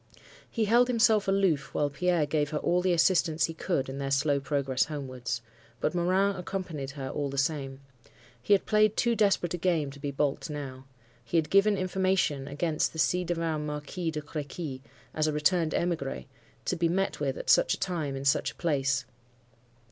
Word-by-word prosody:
He 225 Hz, -2 st, 0 dB
held 240 Hz, +4 st, +4 dB
himself 225 Hz, -4 st, +3 dB
aloof 195 Hz, -7 st, +1 dB
while 145 Hz, -1 st, +1 dB
Pierre 170 Hz, +2 st, +1 dB
gave 145 Hz, 0 st, 0 dB
her 155 Hz, -, -2 dB
all 175 Hz, +4 st, +1 dB
the 185 Hz, 0 st, +1 dB
assistance 170 Hz, -2 st, +3 dB
he 165 Hz, -, -5 dB
could 160 Hz, -4 st, -1 dB
in 135 Hz, +1 st, -6 dB
their 135 Hz, 0 st, -2 dB
slow 140 Hz, +1 st, +2 dB
progress 135 Hz, -2 st, 0 dB
homewards. 130 Hz, -5 st, -5 dB, 0.4 s
But 150 Hz, -, 0 dB
Morin 185 Hz, +3 st, +2 dB
accompanied 180 Hz, -6 st, -4 dB
her 135 Hz, -1 st, -4 dB
all 145 Hz, -1 st, -2 dB
the 140 Hz, -, -6 dB
same. 140 Hz, -1 st, -1 dB, 0.6 s
He 205 Hz, -, +3 dB
had 195 Hz, -, -2 dB
played 215 Hz, 0 st, +3 dB
too 235 Hz, -1 st, +2 dB
desperate 200 Hz, -5 st, +2 dB
a 175 Hz, -, -3 dB
game 165 Hz, -5 st, +1 dB
to 140 Hz, -, -12 dB
be 145 Hz, 0 st, -3 dB
baulked 140 Hz, +3 st, -1 dB
now. 135 Hz, -3 st, -6 dB, 0.4 s
He 170 Hz, -, -1 dB
had 160 Hz, -2 st, 0 dB
given 200 Hz, +1 st, +4 dB
information 185 Hz, -7 st, 0 dB
against 155 Hz, +2 st, -1 dB
the 160 Hz, -, -7 dB
ci 180 Hz, +3 st, +2 dB
devant 165 Hz, -3 st, -2 dB
Marquis 150 Hz, +4 st, -4 dB
de 155 Hz, -1 st, -3 dB
Crequy, 145 Hz, -2 st, -6 dB, 0.3 s
as 155 Hz, 0 st, +1 dB
a -, -, +1 dB
returned 160 Hz, +2 st, +1 dB
emigre, 140 Hz, -, -2 dB, 0.4 s
to -, -, 0 dB
be 170 Hz, -1 st, +1 dB
met 195 Hz, +3 st, 0 dB
with -, -, -1 dB
at -, -, 0 dB
such -, -, +4 dB
a -, -, -16 dB
time, 160 Hz, -7 st, -2 dB
in 135 Hz, 0 st, -5 dB
such 140 Hz, -, +2 dB
a -, -, -31 dB
place. 140 Hz, -4 st, 0 dB
160 Hz, 190 wpm, -28 LUFS, 140-185 Hz, 0.6 s, held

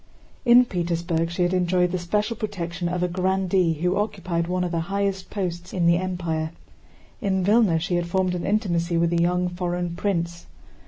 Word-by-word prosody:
In 245 Hz, +1 st, +7 dB
Petersburg 170 Hz, -3 st, -1 dB
she 175 Hz, +1 st, -1 dB
had 175 Hz, +1 st, +1 dB
enjoyed 180 Hz, -1 st, +2 dB
the 185 Hz, -, -1 dB
special 210 Hz, +6 st, -1 dB
protection 180 Hz, -5 st, -3 dB
of 180 Hz, 0 st, -1 dB
a -, -, +2 dB
grandee 185 Hz, -1 st, +1 dB
who 180 Hz, +5 st, 0 dB
occupied 185 Hz, -5 st, -1 dB
one 180 Hz, 0 st, 0 dB
of 175 Hz, -, -2 dB
the 170 Hz, -, 0 dB
highest 195 Hz, -1 st, -1 dB
posts 180 Hz, -3 st, -4 dB
in 180 Hz, -2 st, +1 dB
the 170 Hz, 0 st, +5 dB
Empire. 170 Hz, -3 st, -2 dB, 0.7 s
In 190 Hz, -3 st, 0 dB
Vílna 205 Hz, -5 st, +4 dB
she 175 Hz, +2 st, -1 dB
had 175 Hz, 0 st, -1 dB
formed 185 Hz, 0 st, +1 dB
an 175 Hz, -1 st, -3 dB
intimacy 175 Hz, -5 st, 0 dB
with 170 Hz, 0 st, +2 dB
a 170 Hz, -, +2 dB
young 180 Hz, +1 st, +2 dB
foreign 175 Hz, -1 st, -3 dB
prince. 170 Hz, -3 st, -2 dB
180 Hz, 180 wpm, -24 LUFS, 170-190 Hz, 0.7 s, In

